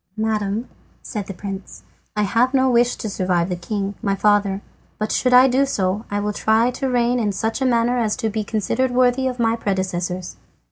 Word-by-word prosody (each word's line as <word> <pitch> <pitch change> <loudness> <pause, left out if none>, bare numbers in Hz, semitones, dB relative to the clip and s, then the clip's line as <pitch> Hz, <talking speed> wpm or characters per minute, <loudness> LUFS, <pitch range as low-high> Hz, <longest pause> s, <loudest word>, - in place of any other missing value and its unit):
"Madam," 215 +1 -1 0.4
said 210 -5 -5
the - - -5
prince, 195 0 -7 0.3
"I 210 - +1
have 240 +6 +2
no 260 -1 +3
wish 240 0 +3
to - - -5
survive 180 -3 0
the 180 - -1
king, 195 +3 -3
my 195 -1 0
father, 205 -1 +2 0.3
but 215 0 -2
should 250 - +1
I 250 +1 +8
do 265 +2 +3
so 195 -3 -1
I 205 - -1
will 210 0 -2
try 220 +4 +2
to 265 +1 -3
reign 245 0 +2
in 210 -3 0
such 220 +6 -2
a - - +2
manner 240 0 +2
as 220 -3 0
may 220 - +2
be 215 0 -2
considered 225 +5 0
worthy 250 +1 +2
of 250 -1 -3
my 230 -1 +2
predecessors." 185 -4 -3
215 Hz, 200 wpm, -21 LUFS, 200-245 Hz, 0.4 s, I